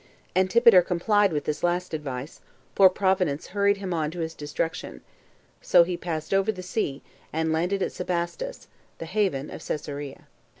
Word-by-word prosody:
Antipater 190 Hz, +2 st, +6 dB
complied 200 Hz, +3 st, +2 dB
with 150 Hz, -2 st, -1 dB
this 150 Hz, -, -3 dB
last 175 Hz, 0 st, 0 dB
advice, 140 Hz, -2 st, -5 dB, 0.3 s
for 195 Hz, -1 st, +7 dB
Providence 185 Hz, -6 st, 0 dB
hurried 200 Hz, +1 st, +2 dB
him 190 Hz, -2 st, -4 dB
on 155 Hz, -2 st, 0 dB
[to 170 Hz, +2 st, -6 dB
his 160 Hz, 0 st, -3 dB
destruction]. 150 Hz, +3 st, -4 dB, 0.6 s
So 175 Hz, -, +6 dB
he 180 Hz, +1 st, -3 dB
passed 165 Hz, -1 st, -4 dB
over 195 Hz, +2 st, +3 dB
the 185 Hz, -3 st, -8 dB
sea, 180 Hz, -7 st, -3 dB, 0.3 s
and 160 Hz, 0 st, 0 dB
landed 180 Hz, +4 st, 0 dB
at -, -, -2 dB
Sebastus, 180 Hz, -, -4 dB, 0.3 s
the -, -, -6 dB
haven 165 Hz, -7 st, -1 dB
of -, -, -8 dB
Cesarea. 145 Hz, -2 st, -5 dB
175 Hz, 160 wpm, -26 LUFS, 155-195 Hz, 0.6 s, for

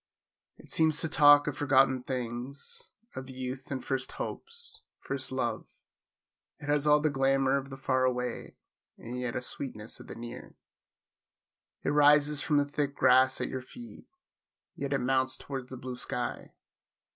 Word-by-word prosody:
It -, -, -16 dB
seems 160 Hz, -1 st, +2 dB
to 165 Hz, -, 0 dB
talk 145 Hz, -2 st, +7 dB
of 150 Hz, -, -2 dB
forgotten 135 Hz, -2 st, +3 dB
things; 125 Hz, +2 st, -6 dB, 0.3 s
of 130 Hz, 0 st, -6 dB
youth 130 Hz, 0 st, -6 dB
and 130 Hz, -2 st, -4 dB
first 135 Hz, -1 st, -2 dB
hopes; 465 Hz, -1 st, -7 dB, 0.2 s
first 135 Hz, -1 st, -4 dB
love; 120 Hz, -4 st, -2 dB, 0.9 s
it 145 Hz, -, -10 dB
has 145 Hz, 0 st, +2 dB
all 150 Hz, 0 st, +6 dB
the 155 Hz, 0 st, +1 dB
glamour 135 Hz, 0 st, +2 dB
of 135 Hz, 0 st, -2 dB
the 135 Hz, -, -8 dB
far 130 Hz, -1 st, +1 dB
away, 125 Hz, -1 st, -2 dB, 0.4 s
and 125 Hz, +2 st, -6 dB
yet 125 Hz, -1 st, -3 dB
a -, -, -1 dB
sweetness 115 Hz, -4 st, -7 dB
of -, -, -12 dB
the -, -, -8 dB
near. 120 Hz, +1 st, -9 dB, 1.3 s
It -, -, 0 dB
rises 150 Hz, 0 st, +5 dB
from 150 Hz, -, +1 dB
the 145 Hz, -, +3 dB
thick 145 Hz, 0 st, -2 dB
grass 130 Hz, 0 st, +5 dB
at -, -, -1 dB
your 130 Hz, -, -4 dB
feet, 240 Hz, -, -12 dB, 0.7 s
yet 140 Hz, -1 st, -4 dB
it 140 Hz, -, +3 dB
mounts 130 Hz, +1 st, +1 dB
towards 135 Hz, -2 st, -6 dB
the 130 Hz, -, -7 dB
blue 125 Hz, 0 st, -6 dB
sky! 125 Hz, 0 st, -4 dB
135 Hz, 160 wpm, -30 LUFS, 130-145 Hz, 1.3 s, talk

